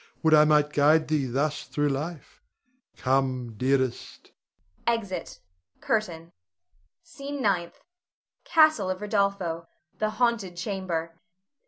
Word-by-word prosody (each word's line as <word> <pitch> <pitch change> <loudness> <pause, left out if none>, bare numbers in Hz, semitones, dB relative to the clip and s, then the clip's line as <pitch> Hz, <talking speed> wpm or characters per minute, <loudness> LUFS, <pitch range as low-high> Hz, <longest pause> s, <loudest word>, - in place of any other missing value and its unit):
Would 160 -1 +4
I 150 0 +7
might 150 -1 +3
guide 155 +2 +4
thee 150 -4 +1
thus 145 +4 -1
through 145 0 0
life! 150 +3 -5 0.6
Come, 130 -2 0
dearest! 130 +1 -1 0.6
[Exit. 225 -5 -2 0.4
CURTAIN. 170 -7 -2 0.7
SCENE 285 -3 -7
NINTH. 190 -8 -1 0.6
[Castle 310 - +4
of 185 +1 -3
Rodolpho. 200 -5 -1 0.3
_The 215 - +1
haunted 215 -6 0
chamber. 170 -4 -4
170 Hz, 105 wpm, -26 LUFS, 150-205 Hz, 0.7 s, I